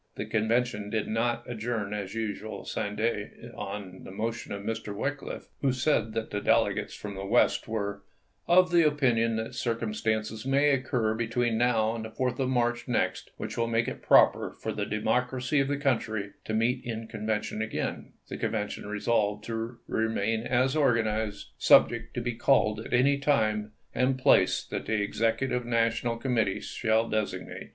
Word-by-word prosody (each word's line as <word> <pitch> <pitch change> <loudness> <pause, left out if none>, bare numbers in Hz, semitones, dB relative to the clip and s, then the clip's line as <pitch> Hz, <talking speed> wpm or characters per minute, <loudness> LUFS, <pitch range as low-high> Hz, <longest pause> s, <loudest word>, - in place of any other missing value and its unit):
The - - -4
Convention 110 -1 0
did 110 0 -1
not 115 +2 -1
adjourn 115 -3 -3
as 100 -1 -4
usual 110 -1 -4
sine 100 0 -3
die. 110 -1 -1 0.3
On 95 -2 -6
the - - -9
motion 115 +4 -4
of 100 0 -5
Mr. 110 -2 -4
Wickliffe, 140 +6 -4 0.2
who 135 - +3
said 125 -4 +1
that 110 0 -3
the 105 - -2
del - - +4
egates - - -4
from 105 -1 -6
the 95 0 -6
West 110 +5 +2
were 100 -2 -3 0.5
"of 180 +1 +5
the 175 -1 +6
opinion 125 -7 +2
that 110 0 -3
circumstances 110 -1 -2
may 140 +2 +3
occur 125 -5 +1
between 115 +1 0
now 110 -2 +2
and 115 -1 -5
the 110 - -6
4th 125 +4 -2
of 130 -1 +1
March 120 -2 0
next 125 - -1
which - - -5
will 115 - +1
make 115 0 +1
it - - -5
proper - - +5
for - - -3
the 105 -1 -3
Democracy 125 +5 0
of 135 - +2
the 145 0 0
country 110 -7 -1
to 110 - -3
meet 125 +3 +1
in 115 -2 -5
conven 110 -1 -2
tion 110 - -4
again," 110 0 -3
the - - -6
Convention 105 -2 -3
resolved 105 0 0
to 115 +1 -4
" - - -41
remain 110 0 0
as 130 +2 +2
organized, 110 -7 0
subject 120 0 +4
to 120 - -1
be 120 0 -2
called 115 -3 +3
at 110 - -8
any 140 +3 +3
time 110 -7 +1 0.2
and 130 +2 +1
place 130 -8 +4
that - - -5
the 110 -1 +1
Executive 115 +5 0
National 115 0 0
Committee 115 -5 0
shall 115 0 0
designate." 110 -2 -3
115 Hz, 175 wpm, -28 LUFS, 110-125 Hz, 0.5 s, the